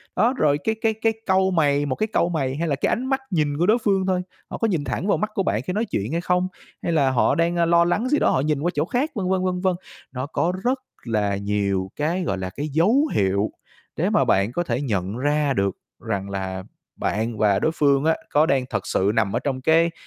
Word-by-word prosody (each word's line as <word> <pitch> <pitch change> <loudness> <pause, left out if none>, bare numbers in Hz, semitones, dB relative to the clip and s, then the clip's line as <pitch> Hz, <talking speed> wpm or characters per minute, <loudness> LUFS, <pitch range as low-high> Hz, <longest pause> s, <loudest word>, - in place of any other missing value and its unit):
Đó, 240 +4 +3
rồi 145 -1 +3
cái 220 0 0
cái 225 -1 +2
cái 220 +1 0
cau 190 0 +3
mày, 145 -4 +2
một 130 -2 -1
cái 215 - -1
cau 170 - +2
mày 135 -5 -1
hay 165 +2 -2
là 140 - +1
cái - - 0
ánh 250 +3 -1
mắt 270 0 0
nhìn 150 -4 0
của 175 - +2
đối 220 +4 +4
phương 195 -2 +2
thôi, 185 -1 +1 0.3
họ - - -5
có 225 - +1
nhìn 170 -8 0
thẳng 185 - -3
vào - - +3
mắt 215 - -2
của 195 - +1
bạn 105 - 0
khi 180 - -4
nói 220 +3 0
chuyện 110 - -3
hay 170 +1 -1
không, 180 +1 +1 0.3
hay 170 - -1
là 140 -5 +3
họ 125 - +2
đang, 170 +1 +1
ơ, 170 -1 +2
lo 170 0 +4
lắng 215 +8 0
gì 295 - +3
đó - - +3
họ - - +2
nhìn 150 -1 0
qua 175 +2 0
chỗ 150 +2 0
khác, 270 - -1
vân 185 -3 -2
vân, 190 -1 +1
vân 180 -1 -1
vân. 185 -2 +1 0.4
Nó 130 0 -4
có 165 +4 -1
rất 255 +2 +1 0.2
là 105 -4 0
nhiều 100 -2 -1
cái, 170 +5 -1
gọi 100 - -1
là, 95 0 -4
cái 145 +10 -5
dấu 210 - +3
hiệu 100 +1 +1 0.4
để - - 0
mà - - +3
bạn 100 +4 +2
có 175 +6 -1
thể 125 -2 -2
nhận 100 -4 -2
ra 145 +1 +1
được 100 -4 0 0.2
rằng 100 -3 -3
là 95 -1 -4 0.3
bạn 110 +1 -2
và 100 -2 +3
đối 160 - +1
phương 140 -2 +2
á, 160 - +3
có 150 +2 +4
đang 135 -4 +1
thật 100 -4 -3
sự 100 +2 +1
nằm 110 -1 +1
ở - - +2
trong 130 -2 -3
cái 165 +3 +3
150 Hz, 255 wpm, -23 LUFS, 115-185 Hz, 0.4 s, đối